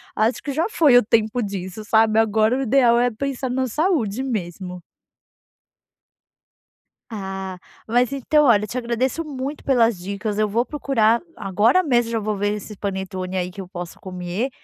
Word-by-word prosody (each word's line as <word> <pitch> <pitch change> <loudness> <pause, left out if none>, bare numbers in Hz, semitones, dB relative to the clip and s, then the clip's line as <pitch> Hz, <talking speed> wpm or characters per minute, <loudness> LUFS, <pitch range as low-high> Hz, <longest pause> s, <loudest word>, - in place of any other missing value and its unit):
acho 220 +3 +1
que 285 - -3
já 315 +6 0
foi 295 - +5
o 245 - +5
tempo 220 +2 +1
disso, 195 -1 -5
sabe. 220 +1 +4
Agora 220 +2 +2
o 270 - -1
ideal 240 -2 +4
é 245 - +3
pensar 265 +2 -3
na 260 +1 0
saúde 260 - 0
mesmo. 180 -6 -4 2.3
Ah, 190 -3 -5 0.3
mas 245 +3 +2
então 300 +3 +2
olha 215 -6 +4
eu - - -7
te 240 - -6
agradeço 250 +6 -1
muito 280 0 -5
pelas 235 -6 +3
dicas, 200 +3 -4
eu 215 - +3
vou 225 +4 +1
procurar 235 -6 +1
agora 210 - +2
mesmo 240 -7 +1
já 225 - +1
vou 215 -1 -2
ver 205 +1 0
esses 210 0 -7
panetone 190 -1 -4
aí 180 0 -2
que 195 +1 -8
eu - - -10
posso 175 -3 -8
comer, 185 +6 -4
220 Hz, 170 wpm, -22 LUFS, 195-255 Hz, 2.3 s, foi